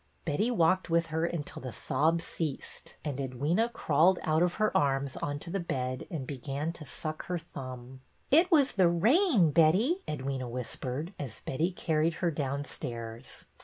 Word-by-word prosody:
Betty 175 +10 +1
walked 185 -5 +2
with 170 0 +3
her 160 +1 +1
until 165 -4 -5
the 130 - -5
sobs 160 +8 +1
ceased, 155 -5 -5
and 140 -3 -3
Edwyna 145 - 0
crawled 165 0 +3
out 155 +1 +2
of 175 0 +2
her 215 -1 +1
arms 135 -1 +1
onto 145 +4 -4
the 195 - -1
bed 130 -7 -3
and 150 -6 -4
began 140 +4 -3
to 150 -4 -10
suck 155 +5 -5
her 180 - -1
thumb. 130 -5 -9 0.3
It 330 +6 +6
was 295 -6 +5
the 185 -3 +4
rain, 220 - +4
Betty," 185 - +4
Edwyna 135 -3 -3
whispered, 125 - -4
as 130 -7 -6
Betty 155 +7 0
carried 165 -2 0
her 170 -1 0
downstairs. 130 -5 -4
155 Hz, 160 wpm, -30 LUFS, 135-175 Hz, 0.3 s, It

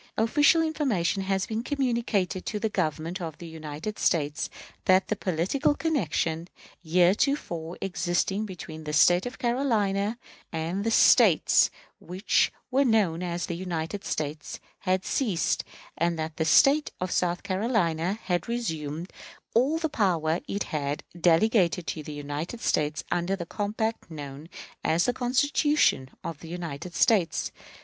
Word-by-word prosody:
Official 290 +8 +4
information 250 - 0
has 195 0 0
been 220 0 -3
communicated 235 - -1
to 215 - -2
the 220 +1 -1
Government 170 -1 -2
of 160 -3 -5
the 175 - -9
United 160 +4 -6
States 150 -3 0 0.4
that 185 +1 +4
the 215 - +1
political 190 - 0
connection 170 - -1 0.4
heretofore 175 - +1
existing 190 +3 -1
between 160 -4 -8
the 150 - -4
State 175 +7 +5
of 245 - -6
South - - -13
Carolina 225 -4 0 0.3
and 165 +4 -2
the 225 - +1
States 225 - +5 0.3
which 185 +4 +1 0.2
were 270 +2 +4
known 210 -9 +2
as 175 -1 -2
the - - -4
United 175 +2 -4
States 150 0 -4 0.2
had 185 -1 0
ceased, 210 -11 0 0.3
and 170 0 0
that 155 0 -4
the 160 - 0
State 275 - +5
of 185 0 -3
South 175 -1 0
Carolina 190 -3 0
had 175 -2 -1
resumed 165 -8 -3 0.4
all 265 +8 +3
the 325 0 0
power 175 - +1
it 200 - -2
had 145 -1 -2 0.2
delegated 180 +1 +3
to 160 - -4
the 150 - -8
United 145 +8 -5
States 150 -9 0
under 175 +2 0
the 175 -3 -6
compact 220 +3 -3
known 145 0 -8 0.3
as 165 +2 +2
the 245 - +1
Constitution 260 - +2
of 165 -3 -5
the 165 - -10
United 170 -1 -6
States. 190 -8 +2
180 Hz, 140 wpm, -27 LUFS, 160-220 Hz, 0.4 s, State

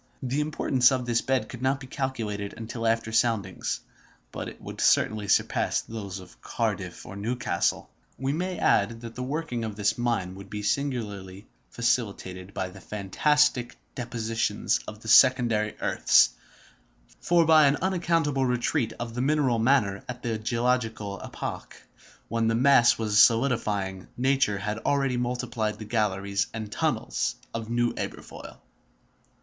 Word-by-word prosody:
The 130 +3 -1
importance 140 -4 +2
of 130 -2 -1
this 120 -1 +1
bed 130 -1 0
could 125 - -9
not 135 +1 +1
be 135 - -9
calculated 115 -7 -4
until 115 0 -4
after 115 0 0
soundings, 110 -5 0 0.5
but - - -5
it - - -13
would - - -7
certainly 105 -2 +3
surpass - - +2
those 100 -4 -7
of 90 -1 -15
Cardiff - - -3
and 100 +2 -8
Newcastle. 120 -4 -1 0.3
We 135 +2 -1
may 180 +3 -2
add 115 +3 +2
that 115 -1 -8
the 125 - -6
working 135 -2 -3
of 110 -2 -4
this 105 +2 0
mine 115 -7 -1
would 100 +1 -11
be 105 0 -5
singularly 105 -7 -3 0.2
facilitated 100 -6 -2
by 95 -2 -3
the - - -13
fantastic 125 +5 +1 0.2
dispositions 115 -3 -1
of 110 0 -8
the 110 - -11
secondary 115 -3 +5
earths; - - +4 0.9
for 170 -1 +3
by 155 -2 +6
an 140 - +3
unaccountable 165 -7 +1
retreat 125 0 0
of 120 -1 -5
the 120 - -2
mineral 135 -4 +2
matter 110 -5 +2
at 125 0 -6
the 115 -2 -2
geological 115 -3 -1
epoch, - - -6 0.5
when 115 -1 0
the 115 - +2
mass 125 -1 +5
was 105 -2 +1
solidifying, 105 -6 +2
nature 130 -5 +2
had 105 +3 -3
already 135 0 +1
multiplied 120 -3 -2
the 110 - -8
galleries 100 -2 0
and 110 -2 -5
tunnels - - -1 0.2
of 115 -1 -5
New 120 0 +1
Aberfoyle. - - -7
115 Hz, 145 wpm, -27 LUFS, 105-130 Hz, 0.9 s, by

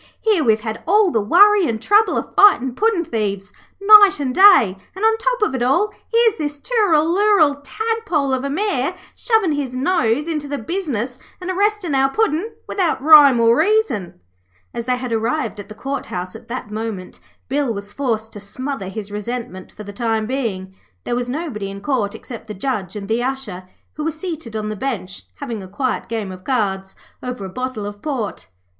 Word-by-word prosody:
'Here 425 -8 +2
we've 220 -4 +2
had 220 0 -5
all 410 0 +4
the 225 - +1
worry 395 - +5
and 225 -2 -2
trouble 415 - +3
of - - -4
fightin' 265 -11 +5
puddin' 420 - +1
thieves 205 - -3 0.3
night 400 -2 +7
and 265 -3 -2
day, 365 - +6 0.2
and, 395 +3 -1
on 445 0 +4
top - - 0
of 420 - 0
it 260 - -2
all, 345 +13 +2 0.2
here's 460 -2 +3
this 295 -2 -4
Tooralooral 345 -6 +2
tadpole 360 - -1
of 260 0 -1
a 280 - -2
Mayor 350 -2 -1 0.2
shovin' 445 -8 +1
his 280 -4 -3
nose 275 -1 +1
into 305 -3 -3
the 285 0 -3
business 270 - -3 0.2
and 365 0 -4
arrestin' 400 -3 0
our 270 0 +3
Puddin' 410 +3 0 0.2
without 355 -8 0
rhyme 285 -3 +7
or 230 0 +4
reason.' 320 - 0 0.5
As 235 - -5
they 250 0 0
had 250 -2 -4
arrived 230 +2 -1
at 205 - -9
the 215 - -10
Court 275 +6 -4
House 180 +2 -5
at 225 - -12
that 235 -3 -6
moment, 215 -4 -6 0.3
Bill 275 -2 0
was 200 -1 -6
forced 225 -5 -2
to 205 - -8
smother 230 +2 -5
his 205 +1 -7
resentment 210 -3 -6
for 210 - -10
the 205 0 -9
time 225 -1 -1
being. 215 -7 -3 0.3
There 240 - -2
was 245 0 -2
nobody 250 -9 -4
in 195 0 -7
Court 210 -3 -1
except 230 -2 -10
the 210 - -7
Judge 195 -4 -3
and 200 -1 -6
the 225 +3 0
Usher, 250 -9 -4 0.3
who 305 - -5
were 320 - 0
seated 315 - -6
on 215 -1 -3
the 215 - -4
bench 200 -6 -5
having 235 -7 -6
a 190 - -9
quiet 255 +7 -3
game 220 -4 -4
of 185 0 -11
cards 195 -7 -2 0.3
over 250 -5 -5
a - - -6
bottle 255 -1 -4
of 205 0 -8
port. 225 - -4
260 Hz, 190 wpm, -19 LUFS, 215-335 Hz, 0.5 s, night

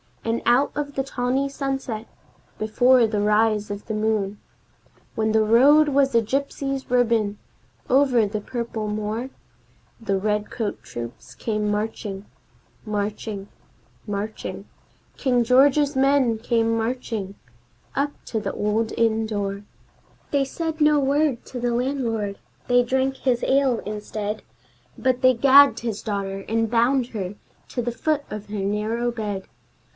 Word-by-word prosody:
And 230 +1 0
out 245 +4 +4
of 285 -1 -3
the 270 - 0
tawny 265 +1 -1
sunset, 270 -5 -3 0.5
before 245 +3 +4
the 210 -2 -1
rise 210 0 +2
of 205 0 -6
the 220 - -4
moon, 215 -2 -1 0.7
When 220 0 0
the 220 0 +4
road 280 +8 +6
was 275 -2 +2
a 230 - +6
gypsy's 275 +2 -2
ribbon 230 -4 +2 0.5
over 255 -4 +4
the 210 +1 -3
purple 230 -1 -4
moor, 215 +4 -3 0.7
The 200 -4 -1
redcoat 210 +1 -2
troops 120 +2 -8
came 210 - -1
marching 210 -1 -3 0.6
Marching 210 -1 -3 0.6
marching 205 +1 -4 0.5
King 250 -3 +2
George's 280 +4 +4
men 265 -4 +3
came 230 -1 +1
marching, 225 -4 -3 0.6
up 285 +1 +1
to 225 - -2
the 200 -2 -4
old 220 +2 0
inn 225 -1 +1
door. 200 -2 -3 0.7
They 280 -1 +2
said 320 +3 -4
no 300 0 +5
word 280 -2 +1
to 250 - -6
the 240 0 0
landlord; 235 -5 -1 0.3
they 245 0 +5
drank 265 +2 0
his 250 -3 0
ale 265 -3 +2
instead, 210 0 -4 0.6
But 255 -1 +1
they 255 -1 +6
gagged 275 +3 +7
his 225 -3 -3
daughter 195 -2 -3
and 225 0 0
bound 240 +2 +3
her 200 -4 -5 0.3
to 245 - -2
the 240 - -1
foot 295 +5 -1
of 210 -1 -6
her 205 0 -4
narrow 215 +4 -1
bed. 210 -4 -4
230 Hz, 135 wpm, -23 LUFS, 210-265 Hz, 0.7 s, gagged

